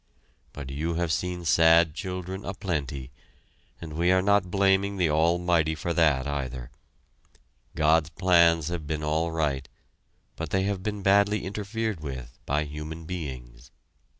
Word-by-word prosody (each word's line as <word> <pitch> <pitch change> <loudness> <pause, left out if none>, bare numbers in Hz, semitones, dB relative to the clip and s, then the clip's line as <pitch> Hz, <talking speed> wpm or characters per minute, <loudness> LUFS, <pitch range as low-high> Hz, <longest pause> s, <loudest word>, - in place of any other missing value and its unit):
But 70 -2 -8
you 80 +5 -2
have 85 -1 -1
seen 90 +2 -2
sad 80 -1 +5
children 95 +2 -5
a 100 - -5
plenty, 70 -8 -4 0.7
and 80 -2 -8
we 85 +3 +2
are 95 0 +3
not 100 -2 +2
blaming 100 +1 +2
the 85 -4 +2
Almighty 85 0 +2
for 85 +3 -3
that 75 -6 +3
either. 65 -4 -4 1.0
God's 80 0 +3
plans 85 -2 +3
have 85 -4 -5
been 75 0 -3
all 80 +2 0
right, 75 -5 -1 0.7
but 80 -2 -5
they 95 +3 +1
have 100 -1 -2
been 105 0 -4
badly 100 +2 +3
interfered 105 0 -3
with 65 -5 -7
by 75 +2 +1
human 75 +2 -7
beings. 65 -7 -7
80 Hz, 145 wpm, -26 LUFS, 75-95 Hz, 1.0 s, sad